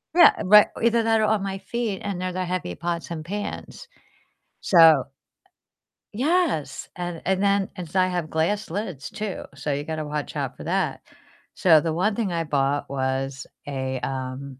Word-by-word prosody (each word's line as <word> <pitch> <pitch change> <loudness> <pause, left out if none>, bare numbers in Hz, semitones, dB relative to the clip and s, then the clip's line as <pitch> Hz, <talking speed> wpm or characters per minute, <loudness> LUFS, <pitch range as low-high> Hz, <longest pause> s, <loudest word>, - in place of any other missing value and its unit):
Yeah, 345 - +8
right, 210 +2 +8
either 235 0 +3
that 225 -1 +3
or - - +2
on 215 -1 +1
my 195 0 -3
feet, 225 -2 -3
and 185 -3 -3
they're 185 0 -2
the 185 0 -2
heavy 175 - -3
pots 170 0 -3
and 160 -2 -6
pans. 205 +4 -6 0.7
So 160 -7 +6 1.1
Yes, 270 - 0
and 175 -2 -5
and 190 +1 +1
then 200 -1 +2
and 175 -3 -7
so 185 - 0
I 185 - +5
have 175 -3 -2
glass 185 +8 0
lids 175 - -4
too, 210 -3 -5
so 140 +1 -2
you 145 - -2
gotta 155 0 -4
watch 150 0 -4
out - - -3
for - - -10
that, - - -1 0.5
so 160 -4 +5
the 165 - -1
one 185 +7 +1
thing 210 -6 -1
I 165 -1 -1
bought 140 -2 0
was 135 0 -2 0.2
a, 130 -2 -3
um, 130 0 -5
170 Hz, 175 wpm, -24 LUFS, 145-200 Hz, 1.1 s, Yeah